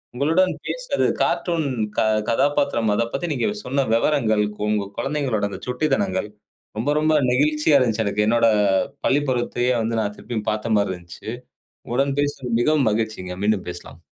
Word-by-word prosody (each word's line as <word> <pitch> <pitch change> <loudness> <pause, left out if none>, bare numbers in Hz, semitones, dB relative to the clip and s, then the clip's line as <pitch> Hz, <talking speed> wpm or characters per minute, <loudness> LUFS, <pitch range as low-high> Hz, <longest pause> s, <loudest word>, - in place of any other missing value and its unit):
உங்களுடன் 165 +8 +2
பேசியது, - - -1 0.2
கார்ட்டூன் 165 -4 0 0.3
க - - +4 0.3
கதாபாத்திரம் 140 -3 +1
அதைப் 115 +2 -1
பத்தி 175 - -2
நீங்க 135 -4 0 0.2
சொன்ன 135 +1 0
விவரங்கள், 115 -4 +2 0.2
உ - - -2
உங்க 105 -1 0
குழந்தைகளோட 135 -7 -1
அந்த - - -7
சுட்டித்தனங்கள், 125 -8 0 0.5
ரொம்ப, 115 +6 -1
ரொம்ப 155 +1 +2 0.2
நெகிழ்ச்சியா 150 +3 +3
இருந்துச்சு. 115 -3 +1
எனக்கு, 105 +1 +1
என்னோட 115 +1 +4 0.6
பள்ளிப்பருவத்தையே 125 -3 +1
வந்து 115 0 -1
நான் 105 -1 -2
திருப்பியும் 110 -2 -5
பார்த்த 110 +1 -1
மாரி 100 -2 +1
இருந்துச்சு. 85 +4 -10 0.6
உங்களுடன் 135 +3 0
பேசியதில் 135 -5 -2
மிகவும் 145 -1 +3
மகிழ்ச்சிங்க. 105 -4 -3
மீண்டும் 105 -2 +1
பேசலாம். 85 - -10
120 Hz, 145 wpm, -22 LUFS, 110-145 Hz, 0.6 s, க